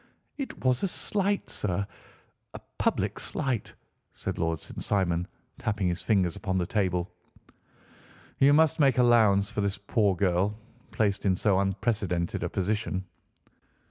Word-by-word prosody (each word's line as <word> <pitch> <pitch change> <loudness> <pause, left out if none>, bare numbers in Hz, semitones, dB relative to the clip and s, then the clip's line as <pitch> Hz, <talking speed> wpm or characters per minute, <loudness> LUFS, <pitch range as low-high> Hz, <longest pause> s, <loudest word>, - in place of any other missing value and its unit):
"It 270 - -6
was 130 -1 +3
a 195 - +1
slight, 200 +2 -1
sir, 100 0 -2 0.7
a - - -6 0.2
public - - 0
slight," 130 -7 -2 0.4
said - - -4
Lord 80 -1 0
St. - - -8
Simon, 90 -4 0 0.3
tapping 105 -3 -1
his 85 +1 -3
fingers 95 -6 +1
upon 95 -1 -2
the 90 - +1
table. 90 -2 -1 1.3
"You 140 +1 +6
must 155 +1 +4
make 135 -4 +4
allowance 110 -5 +4
for 105 - -2
this 100 -1 -1
poor 100 -1 +1
girl, 95 +3 +1 0.3
placed 105 -2 0
in 95 - +3
so 95 0 +2
unprecedented 100 -3 -1
a - - -1
position." 95 -1 -2
100 Hz, 140 wpm, -28 LUFS, 95-115 Hz, 1.3 s, You